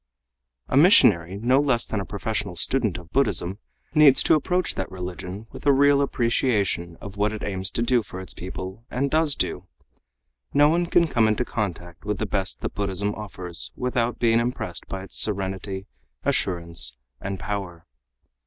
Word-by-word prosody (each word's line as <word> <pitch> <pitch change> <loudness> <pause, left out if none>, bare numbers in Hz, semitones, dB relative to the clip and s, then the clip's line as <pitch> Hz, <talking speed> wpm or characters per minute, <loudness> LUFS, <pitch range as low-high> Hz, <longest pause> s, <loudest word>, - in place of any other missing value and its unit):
A - - -2
missionary 100 - +5
no 125 +5 +3
less 135 -5 +2
than 110 - -3
a 100 - -4
professional 100 -2 -3
student 110 +1 0
of 85 -2 -12
Buddhism 100 -7 +1 0.3
needs 150 -4 +7
to - - +4
approach 180 +4 +1
that 95 - -4
religion 90 +2 -7
with - - -11
a - - +7
real 140 +1 +4
appreciation 110 -10 0
of 100 0 -10
what 105 +1 +1
it 110 - -6
aims 95 -1 -1
to 115 - -2
do 120 0 +3
for 95 -3 -9
its 95 - -7
people 95 +3 -7
and 135 +3 -1
does 155 -2 +2
do. - - -3 0.9
No 145 +1 +6
one 170 +2 +1
can 170 -1 +3
come 115 -7 +2
into 110 +3 0
contact 85 -7 -4
with 105 -1 -2
the 110 - -2
best 95 -3 -1
that - - -4
Buddhism 100 +1 -1
offers 90 -5 -5
without 125 -2 -1
being 115 -1 +3
impressed 115 -6 -3
by 95 0 -5
its 95 - -2
serenity, 95 -1 -1 0.4
assurance 85 -8 +2 0.2
and 95 +2 -5
power. 95 -4 -5
105 Hz, 170 wpm, -24 LUFS, 95-125 Hz, 0.9 s, needs